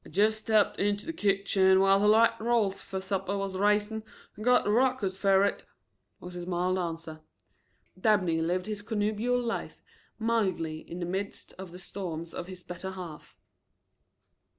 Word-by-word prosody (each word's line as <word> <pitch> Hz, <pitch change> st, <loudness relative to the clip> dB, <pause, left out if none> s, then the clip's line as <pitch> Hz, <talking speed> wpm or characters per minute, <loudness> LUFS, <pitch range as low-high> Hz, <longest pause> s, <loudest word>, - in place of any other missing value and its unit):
"I -, -, -13 dB
jist 215 Hz, +3 st, +2 dB
stepped 215 Hz, -1 st, +2 dB
into 205 Hz, 0 st, 0 dB
the 330 Hz, -, -4 dB
kitchen 195 Hz, -6 st, +3 dB
while 195 Hz, 0 st, +5 dB
her 205 Hz, -, +3 dB
light 225 Hz, +2 st, +6 dB
rolls 225 Hz, -4 st, +1 dB
fer 190 Hz, -, -5 dB
supper 195 Hz, +1 st, -2 dB
was 195 Hz, -1 st, -3 dB
raisin' 210 Hz, +2 st, +1 dB, 0.3 s
and 215 Hz, -, -8 dB
got 250 Hz, +1 st, +4 dB
a 205 Hz, -, +2 dB
ruckus 240 Hz, -5 st, +2 dB
fer 195 Hz, 0 st, +4 dB
it," 200 Hz, -, 0 dB, 0.6 s
was 180 Hz, 0 st, -9 dB
his 175 Hz, 0 st, -6 dB
mild 180 Hz, +1 st, 0 dB
answer. 165 Hz, -2 st, -5 dB, 0.8 s
Dabney 185 Hz, -6 st, +2 dB
lived 180 Hz, +2 st, 0 dB
his 210 Hz, -1 st, -4 dB
connubial 220 Hz, +3 st, 0 dB
life 235 Hz, -2 st, -4 dB, 0.3 s
mildly 190 Hz, -9 st, 0 dB
in 175 Hz, +2 st, -6 dB
the -, -, -1 dB
midst 195 Hz, +3 st, -5 dB
of 190 Hz, -2 st, -8 dB
the 180 Hz, -, -9 dB
storms 175 Hz, -3 st, -6 dB
of 175 Hz, -, -5 dB
his 185 Hz, -1 st, -10 dB
better 180 Hz, +2 st, -6 dB
half. 175 Hz, -5 st, -9 dB
195 Hz, 165 wpm, -29 LUFS, 180-215 Hz, 0.8 s, light